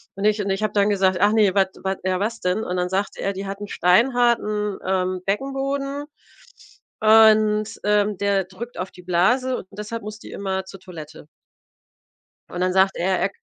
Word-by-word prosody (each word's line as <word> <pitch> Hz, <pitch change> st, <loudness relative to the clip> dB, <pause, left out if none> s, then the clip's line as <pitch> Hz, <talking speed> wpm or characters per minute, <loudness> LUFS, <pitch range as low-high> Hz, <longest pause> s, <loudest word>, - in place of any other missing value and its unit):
Und 195 Hz, -, -6 dB
ich 210 Hz, 0 st, +2 dB
und 200 Hz, -, -3 dB
ich 195 Hz, +2 st, -1 dB
habe 215 Hz, -, -1 dB
dann 205 Hz, 0 st, +3 dB
gesagt: 190 Hz, -2 st, +2 dB
„Ach 205 Hz, +2 st, +4 dB
ne? 210 Hz, -4 st, +3 dB
Was 195 Hz, -1 st, +3 dB, 0.2 s
was 190 Hz, 0 st, -1 dB
ja, 185 Hz, -1 st, 0 dB
was 225 Hz, +2 st, -2 dB
denn?“ 185 Hz, +5 st, -1 dB
Und 180 Hz, 0 st, -3 dB
dann 180 Hz, 0 st, -1 dB
sagt 195 Hz, +2 st, -2 dB
er: 195 Hz, -, -2 dB
„Die 195 Hz, +1 st, -6 dB
hat 195 Hz, +1 st, -5 dB
'n 205 Hz, -, -6 dB
steinharten, 215 Hz, 0 st, +2 dB
ähm, 185 Hz, -1 st, -1 dB
Beckenboden 275 Hz, +5 st, -2 dB, 1.0 s
und, 215 Hz, 0 st, +4 dB
ähm, 210 Hz, -1 st, +1 dB
der 200 Hz, -2 st, +1 dB
drückt 225 Hz, +6 st, -9 dB
auf 185 Hz, -, -4 dB
die 180 Hz, -, -14 dB
Blase 245 Hz, +9 st, +1 dB
und 190 Hz, -, -9 dB
deshalb 210 Hz, +2 st, -6 dB
muss 215 Hz, 0 st, -8 dB
die -, -, -12 dB
immer 190 Hz, -1 st, -3 dB
zur 195 Hz, 0 st, -11 dB
Toilette.“ 155 Hz, -4 st, -11 dB, 1.2 s
Und 180 Hz, -, -5 dB
dann 185 Hz, 0 st, +1 dB
sagt 190 Hz, 0 st, +3 dB
er 185 Hz, +1 st, 0 dB
er 190 Hz, +2 st, +1 dB
k -, -, -24 dB
200 Hz, 195 wpm, -22 LUFS, 185-215 Hz, 1.2 s, Ach